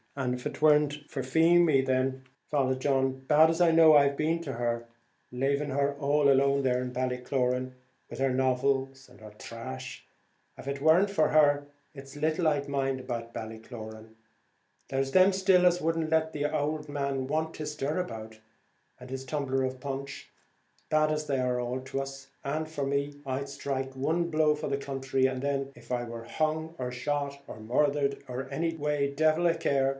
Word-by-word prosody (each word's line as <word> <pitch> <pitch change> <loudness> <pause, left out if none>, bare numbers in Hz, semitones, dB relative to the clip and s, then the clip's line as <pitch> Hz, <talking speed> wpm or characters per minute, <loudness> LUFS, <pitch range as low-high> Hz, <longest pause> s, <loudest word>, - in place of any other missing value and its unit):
An' 130 -3 -1
av 125 0 -6
it - - -5
warn't 150 -1 +3
for 135 - -3
Feemy 160 0 +4
then, 130 0 0 0.3
Father 135 -3 +1
John, 135 0 0
bad 155 +1 +6
as 165 +2 0
I 170 -1 +5
know 160 -1 +7
I've 140 -1 +4
been 165 +2 0
to 140 -5 -5
her, 120 0 -2 0.5
laving 140 +3 0
her 140 +1 +1
all 145 0 +2
alone 140 0 +3
there 125 -1 +1
at 125 - -5
Ballycloran, 125 0 -1 0.4
with - - -8
her 135 -1 +2
novels 135 +1 0
and 125 -2 -19
her 110 - -10
trash, 115 - -8 0.5
av - - -10
it 140 0 -3
warn't 170 +7 +4
for 155 -6 +2
her, 145 -2 +4 0.3
it's 135 0 -11
little 155 +3 +1
I'd 145 -1 -1
mind 135 -1 -1
about 115 -2 -5
Ballycloran. 110 0 -8 0.7
There 135 - -1
is 135 0 -1
them 185 +4 +6
still 190 -1 +4
as 180 0 +4
wouldn't 165 -1 -1
let 160 0 +1
the 145 -1 -2
ould 150 0 -2
man 140 -2 -2
want 160 +2 -2
his 150 -1 -4
stirabout, 130 -8 -4 0.6
and 125 - -11
his 130 0 -5
tumbler 135 -1 -1
of 130 0 -3
punch, 140 +1 -6 0.6
bad 155 0 +3
as 150 0 -2
they 135 -2 0
all 125 -1 -1
are - - -2
to 135 +1 -3
us; 135 0 -8 0.2
and 155 +3 -2
for 145 -3 -3
me, 140 +1 -2
I'd 135 +1 -2
sthrike 135 -1 -4
one 165 +6 0
blow 155 -1 +3
for 150 - -5
the 140 - -1
counthry, 135 -1 -1
and 130 -1 -3
then, 140 -1 -1
if - - -17
I 125 -1 -1
war 115 -1 -7
hung 155 +4 -2
or 125 -1 -3
shot, 140 +2 -2
or 110 - -9
murthered 140 +4 0 0.3
any 165 0 -1
way, 150 -2 0
devil 155 +3 +3
a 165 - +2
care. 135 -4 +1
140 Hz, 180 wpm, -29 LUFS, 130-155 Hz, 0.7 s, know